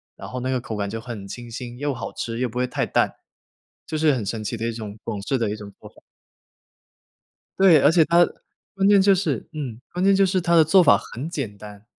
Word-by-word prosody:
然 - - -9
后 125 0 -5
那 130 +1 -2
个 125 -2 -1
口 115 - -6
感 100 -1 -2
就 110 +2 -5
很 110 -5 -8
清 120 +3 -9
新， 120 +1 -8
又 145 0 -1
好 - - -6
吃， 115 0 -4
又 125 0 0
不 120 +2 -5
会 125 - +1
太 - - -1
淡， - - +1 0.7
就 155 - -3
是 155 -1 +3
很 120 -5 -2
神 110 +2 -4
奇 110 +3 -3
的 115 +1 -3
一 - - -1
种 110 -2 -7
广 105 -3 -4
式 130 +4 -1
的 110 -3 0
一 - - -3
种 100 -2 -10
做 - - -12
法。 - - -22 1.6
对， 185 -5 +6
而 145 - +5
且 165 -2 +4
它 175 +1 +5 0.5
关 195 0 +1
键 200 -1 +6
就 200 0 +5
是 160 - -1
嗯， 130 -7 -6
关 180 - -4
键 195 0 +5
就 195 - +4
是 190 0 +1
它 170 -1 +1
的 160 - +7
做 185 +4 +5
法 170 - +6
很 140 +8 -7
简 120 - -5
单。 105 0 -12
125 Hz, 265 characters per minute, -23 LUFS, 110-165 Hz, 1.6 s, 的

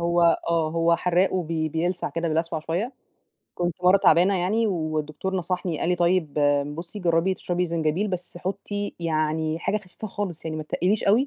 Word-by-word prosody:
هو 170 0 +3
آه، 165 -2 +2
هو 165 0 +3
حراق 180 +2 +2
وبي 165 -3 -1
بيلسع 175 +3 -1
كده 165 0 -2
بيلسوع 160 0 -1
شوية. 180 - -2 0.6
كنت 175 -2 -1
مرة 185 +2 +7
تعبانة 185 +1 +5
يعني 210 +6 +1
والدكتور 155 0 -2
نصحني 180 -2 -2
قال - - 0
لي: 180 - +2
"طيب، 175 -4 +1 0.4
بصي 175 +5 -7
جربي 175 +1 +2
تشربي 180 0 -1
زنجبيل، 165 +4 0
بس 180 -1 -5
حطي 205 +2 -4
يعني 155 -1 0
حاجة 210 - 0
خفيفة 205 +1 -7
خالص، 185 -6 -4
يعني 155 -1 -3
ما 155 - -3
تتقليش 185 +7 0
أوي؛ 230 +8 +4
175 Hz, 170 wpm, -25 LUFS, 160-185 Hz, 0.6 s, مرة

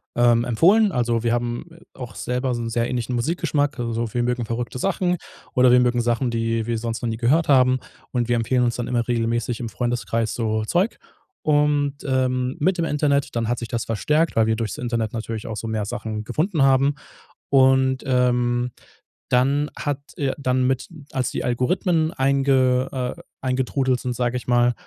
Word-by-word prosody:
ähm, 120 -1 +4
empfohlen. 195 - +4
Also 120 -3 0
wir 115 0 +1
haben, 120 +2 -2
äh, 165 - -16 0.2
auch 125 -2 -7
selber 125 +1 -2
so 120 - -3
'n 115 - -3
sehr 115 +1 0
ähnlichen 125 0 -2
Musikgeschmack. 145 +1 0
Also 115 -1 -2
wir 120 - +1
mögen 125 -1 -1
verrückte 120 +2 -4
Sachen 180 +1 0 0.4
oder 125 -1 +5
wir 125 - +6
mögen 120 -1 +2
Sachen, 120 +1 0
die 115 -1 -1
wir 115 0 -1
sonst 115 -1 -4
noch 120 - -1
nie 110 - -3
gehört 140 +8 +2
haben. 130 -2 +5 0.3
Und 120 -2 -1
wir 120 - +3
empfehlen 125 +2 +1
uns 120 -1 +1
dann 120 0 -3
immer 120 -2 -1
regelmäßig 115 -1 -1
im 115 - -4
Freundeskreis 115 +1 -1
so 110 -2 -1
Zeug. 180 - 0 0.5
Und, 145 -1 +2
ähm, 130 -1 0
mit 185 +5 +2
dem 170 - 0
Internet 145 -2 +1
dann 115 -1 0
hat 120 +1 -1
sich 120 - -5
das 115 0 -2
verstärkt, 150 +9 +1
weil 110 -1 +3
wir 110 - +2
durch's 110 -3 -3
Internet 115 -3 -2
natürlich 115 -1 -5
auch 110 - -4
so 115 +2 -5
mehr 110 -2 -2
Sachen 110 -1 -4
gefunden 155 - 0
haben. 135 +1 +4 0.5
Und, 130 -1 +4
ähm, 125 -1 +1 0.6
dann 140 +4 +2
hat, 145 -1 -2 0.2
äh 140 -2 0
dann 130 -2 +1
mit 130 0 -1 0.2
als 130 -5 -1
die - - -4
Algorithmen 160 +6 +1
einge 135 -1 +2 0.3
äh, - - -12 0.2
eingetrudelt 130 0 0
sind, 125 -1 -3
sage 120 0 -1
ich - - -11
mal, 120 0 +3
125 Hz, 190 wpm, -22 LUFS, 115-135 Hz, 0.6 s, wir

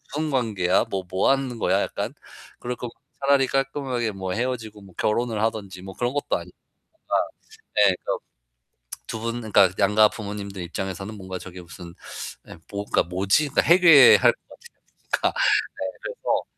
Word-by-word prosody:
무슨 155 0 -1
관계야? 105 -7 +1
뭐, 95 -1 -2
뭐 95 +1 +1
하는 135 -3 0
거야 - - +2
약간. - - -3 0.5
그럴 125 0 -4
거면 120 0 -7 0.3
차라리 140 -1 +3
깔끔하게 135 -4 -1
뭐 95 -2 -5
헤어지고 115 -3 -3
뭐 95 -3 -16
결혼을 110 0 0
하든지 100 -5 -3
뭐 95 0 -8
그런 120 +1 -1
것도 145 - -1
아니고. - - -12 0.4
뭔가 - - -4 0.6
네 100 -2 +5
그런 - - -1 0.9
두 110 - -5
분 115 +2 -3
그러니까 105 -4 +4
양가 105 +1 +5
부모님들 100 -2 -6
입장에서는 95 +4 -5
뭔가 95 -2 -7
저게 90 0 -10
무슨 85 0 -11 0.5
예 - - -11
뭐가 100 0 0
뭐지? 95 - +1
해괴할 165 -6 +7
것 - - -17
같아요. 475 - -17 0.3
그러니까 - - 0
네, - - +4 0.5
그래서 - - -2
110 Hz, 335 characters per minute, -24 LUFS, 95-130 Hz, 0.9 s, 해괴할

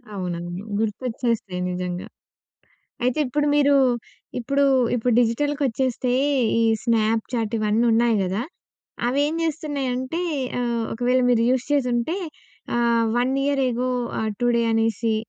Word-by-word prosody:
అవునవును. 175 0 -4 0.2
గుర్తొచ్చేస్తాయి 225 -3 -2
నిజంగ. 180 0 -3 1.0
అయితే 250 +3 +1
ఇప్పుడు 295 +4 0
మీరు 285 -1 +4 0.6
ఇప్పుడు 275 +4 0 0.3
ఇప్పుడు 245 0 +1
డిజిటల్‍కొచ్చేస్తే 255 0 0 0.5
ఈ - - +3 0.2
స్నాప్‌చాట్ 225 0 0
ఇవన్నున్నాయి 230 +2 +2
గదా! 190 +4 -1 0.6
అవి 265 +4 +1
ఏం 310 - -2
జేస్తున్నాయంటే 290 -2 -2 0.4
ఆహ్, 235 -2 -1
ఒకవేళ 250 +2 +1
మీరు 235 -2 +3
యూజ్ 255 -1 +1
చేసుంటే 250 +2 +1 0.6
ఆహ్, 235 -1 +2
1 250 +2 +1
ఇయర్ 280 -1 +1
ఎగో 250 +1 -1 0.3
ఆహ్, 220 0 -1
టుడే 240 -1 +2
అనేసి 225 0 +1
240 Hz, 110 wpm, -23 LUFS, 225-260 Hz, 1.0 s, మీరు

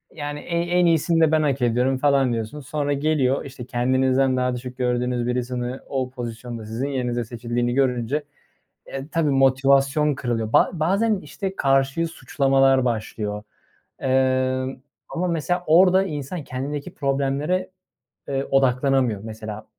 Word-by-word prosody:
Yani, 145 -1 -5
e - - -11 0.2
en 175 +1 +2
iyisini 165 0 +3
de 160 -1 +4
ben 155 - +3
hak 140 -3 0
ediyorum 125 +2 +2
falan 135 -2 +2
diyorsun. 115 +6 -4
Sonra 145 +1 -2
geliyor. 140 -2 +1
İşte, 130 -3 -9
kendinizden 130 +1 +2
daha 125 0 0
düşük 125 +1 -7
gördüğünüz 125 -1 0
birisini 125 +1 -2
o 130 -2 -2
pozisyonda 120 -2 -7
sizin 115 +6 -3
yerinize 125 -3 -1
seçildiğini 120 +1 -2
görünce, 130 +2 0 0.6
eee, 135 +1 -6
tabii, 165 -2 +1
motivasyon 135 +2 +3
kırılıyor. 115 -4 -2
Ba - - +5
bazen, 195 +6 +1
işte, 190 +5 -6
karşıyı 135 +3 +2
suçlamalar 135 -3 +2
başlıyor. 110 -3 -3 0.6
Emm, 130 0 +1 0.3
ama 180 +2 -2
mesela 175 +2 -1
orada 180 +4 +6
insan 150 -1 -5
kendindeki 140 +3 -5
problemlere, 140 +6 -1 0.6
eee, 135 0 -1
odaklanamıyor. 130 -4 +2
Mesela, 110 -1 -7
135 Hz, 135 wpm, -23 LUFS, 125-145 Hz, 0.6 s, orada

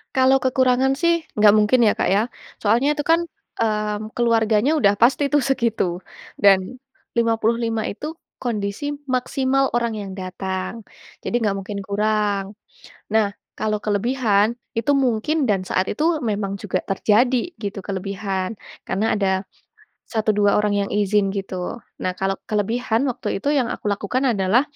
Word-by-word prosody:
Kalau 265 0 +5
kekurangan 260 0 +2
sih 335 -1 +2
enggak 210 -1 +6
mungkin 215 +4 +3
ya - - +5
Kak, - - +2
ya. 205 - +3 0.4
Soalnya 240 +8 +3
itu 295 - -2
kan, 330 - +5 0.4
mmm, 215 -1 -1
keluarganya 230 +1 +2
udah 200 -4 +4
pasti 265 +4 +4
tuh 290 -2 +4
segitu, 230 -9 0 0.4
dan 200 -2 +6 0.6
55 230 0 +1
itu 305 +10 -6 0.2
kondisi 235 +5 -3 0.2
maksimal 265 +1 +1
orang 235 -1 0
yang 200 -2 -6
datang. 190 +3 -5 0.4
Jadi - - -2
nggak 205 -2 +1
mungkin 200 +1 -5
kurang. 205 0 0 0.6
Nah, 210 -2 +2 0.2
kalau 215 -1 0
kelebihan, 215 0 +1 0.2
itu 230 +5 +1
mungkin 270 +4 +1
dan 200 -3 +2
saat 185 - +1
itu 300 - -2 0.2
memang 200 -3 -1
juga 185 -2 -2
terjadi, 240 - +1
gitu 205 -1 -4
kelebihan. 195 +1 -3 0.3
Karena 215 +4 +1
ada 190 -1 0 0.6
1, 220 -1 -1
2 205 -1 +3
orang 210 -1 +1
yang - - -9
izin 205 -1 +2
gitu. 195 +2 -4 0.2
Nah, 185 - -1
kalau 195 +1 -1
kelebihan, 225 +4 0
waktu 235 -5 -3
itu 280 - -2
yang 260 -4 +2
aku - - -4
lakukan 205 +5 -1
adalah, 195 +6 +3
215 Hz, 145 wpm, -22 LUFS, 200-245 Hz, 0.6 s, enggak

